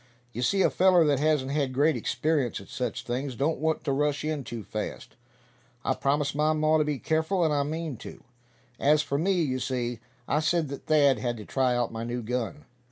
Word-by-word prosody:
You 120 - -4
see, 195 +9 +2
a - - +3
feller 180 -3 +5
that 145 -3 +2
hasn't 150 -3 +1
had 140 -3 0
great 150 +3 +3
experience 150 -8 0
at 100 - -13
such 125 -2 -3
things 125 +2 -3
don't 145 +6 0
want 160 +1 0
to 145 - -1
rush 145 +1 0
in 155 -3 -2
too 115 -3 -6
fast. 105 +1 -6 0.7
I - - +2
promised 140 +1 0
my 150 +2 +2
maw 155 0 +3
to - - +4
be 150 -1 -1
careful, 160 +5 +1
and 155 - +2
I 145 - +2
mean 155 -1 -3
to. - - -11 0.6
As 150 +1 +4
for 140 -1 -1
me, 190 +5 +2
you 130 -3 -1
see, 120 -2 -2 0.3
I 150 - +2
said 155 -1 +1
that 140 - -8
Thad 145 -3 +4
had 120 -2 -2
to 105 - -9
try 130 -2 +1
out 120 -1 -1
my 115 0 -4
new 120 +1 -3
gun. 125 +5 -3
145 Hz, 215 wpm, -27 LUFS, 125-155 Hz, 0.7 s, feller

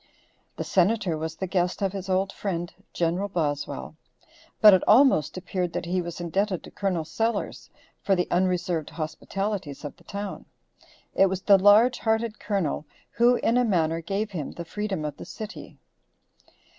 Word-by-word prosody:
The - - -2
Senator 190 -1 +2
was 160 +1 -4
the 190 - -3
guest 180 +1 -1
of 195 -1 0
his 195 -1 -6
old 190 +1 +1
friend 175 -4 -4 0.2
Gen. 170 +3 0
Boswell, 145 - -3 0.6
but 210 -2 +9
it 185 - +5
almost 215 - +5
appeared 185 -1 -3
that - - -3
he 180 +1 0
was 170 -1 -6
indebted 185 +2 -1
to - - -12
Col. 185 -5 -1
Sellers 225 +9 -2 0.3
for 195 - +2
the 180 - 0
unreserved 175 -3 0
hospitalities 165 +1 -4
of 145 - -6
the - - -21
town. 200 0 -6 0.7
It 195 - +5
was 190 0 -3
the 200 -2 +6
large 215 +6 +6
hearted 220 0 0
Colonel 195 -7 -2 0.2
who, 240 +1 +4
in 235 0 +1
a - - +3
manner, 165 -7 +1
gave 200 +5 -2
him 155 -7 -5
the 170 - -7
freedom 195 -3 -3
of 150 -2 -5
the - - -9
city. 215 0 -9
185 Hz, 165 wpm, -26 LUFS, 170-205 Hz, 0.7 s, but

